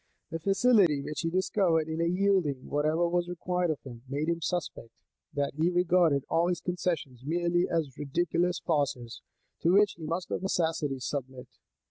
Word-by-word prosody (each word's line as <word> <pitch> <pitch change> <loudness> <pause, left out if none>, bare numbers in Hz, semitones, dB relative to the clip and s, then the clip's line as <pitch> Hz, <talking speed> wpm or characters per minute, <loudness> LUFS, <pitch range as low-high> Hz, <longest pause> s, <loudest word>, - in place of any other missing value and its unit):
The 165 - -3
facility 195 - +4
which 150 - -5
he 165 - -1
discovered 185 -3 +1
in 160 0 -3
yielding 175 -5 +1
whatever 155 +4 +1
was 175 0 0
required 180 0 -1
of 155 - -3
him, 120 -3 -10
made 145 +4 -1
them 170 0 -1
suspect, 165 -8 -3 0.4
that 145 -1 -1
he 160 +4 +1
regarded 175 -5 +3
all 165 +2 +2
his 175 -2 0
concessions 170 -8 -3
merely 175 +3 +1
as 155 -6 -1
ridiculous 170 +4 0
farces, 140 -7 -2 0.4
to 170 - +3
which 205 +1 +5
he - - -8
must 170 +3 -3
of - - -2
necessity 160 -7 0
submit. 130 -1 -5
165 Hz, 160 wpm, -29 LUFS, 145-180 Hz, 0.4 s, which